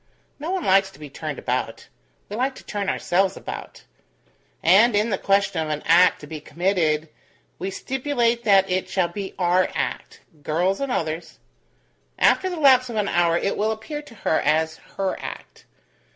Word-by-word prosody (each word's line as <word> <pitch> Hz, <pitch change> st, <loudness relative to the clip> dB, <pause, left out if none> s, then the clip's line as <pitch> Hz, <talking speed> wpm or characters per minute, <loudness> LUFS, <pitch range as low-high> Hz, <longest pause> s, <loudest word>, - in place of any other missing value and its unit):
No 310 Hz, +4 st, -5 dB
one 375 Hz, -2 st, -1 dB
likes 195 Hz, 0 st, +4 dB
to 195 Hz, -, -17 dB
be 150 Hz, -2 st, -10 dB
turned -, -, -5 dB
about; -, -, -3 dB, 0.4 s
we 205 Hz, -, -6 dB
like 260 Hz, +3 st, -1 dB
to -, -, -12 dB
turn 200 Hz, -2 st, -3 dB
ourselves 190 Hz, +2 st, +1 dB
about; -, -, -8 dB, 0.8 s
and 205 Hz, +7 st, +5 dB
in 215 Hz, +2 st, +1 dB
the 195 Hz, -, +1 dB
question 195 Hz, -3 st, +1 dB
of 155 Hz, -, -3 dB
an 150 Hz, -1 st, -3 dB
act 175 Hz, +2 st, +5 dB
to -, -, -8 dB
be 155 Hz, +1 st, -7 dB
committed, 160 Hz, -2 st, 0 dB, 0.5 s
we 185 Hz, +3 st, -3 dB
stipulate 240 Hz, +1 st, -1 dB
that 195 Hz, -3 st, +5 dB
it 185 Hz, 0 st, -1 dB
shall 180 Hz, -3 st, 0 dB
be 195 Hz, +2 st, -6 dB
our 180 Hz, 0 st, +2 dB
act -, -, -4 dB, 0.2 s
girls 175 Hz, -, 0 dB
and 275 Hz, -2 st, -2 dB
others. 165 Hz, -5 st, -3 dB, 0.8 s
After 375 Hz, -, +3 dB
the 355 Hz, -3 st, -5 dB
lapse 260 Hz, -3 st, +5 dB
of 235 Hz, -, -5 dB
an 210 Hz, -2 st, 0 dB
hour, 170 Hz, -1 st, +2 dB
it 195 Hz, -, -1 dB
will 215 Hz, +1 st, +1 dB
appear 220 Hz, +8 st, -5 dB
to 265 Hz, -6 st, -15 dB
her 160 Hz, -, 0 dB
as 160 Hz, +1 st, +1 dB, 0.2 s
her 195 Hz, -1 st, -1 dB
act. -, -, -9 dB
195 Hz, 180 wpm, -23 LUFS, 170-230 Hz, 0.8 s, and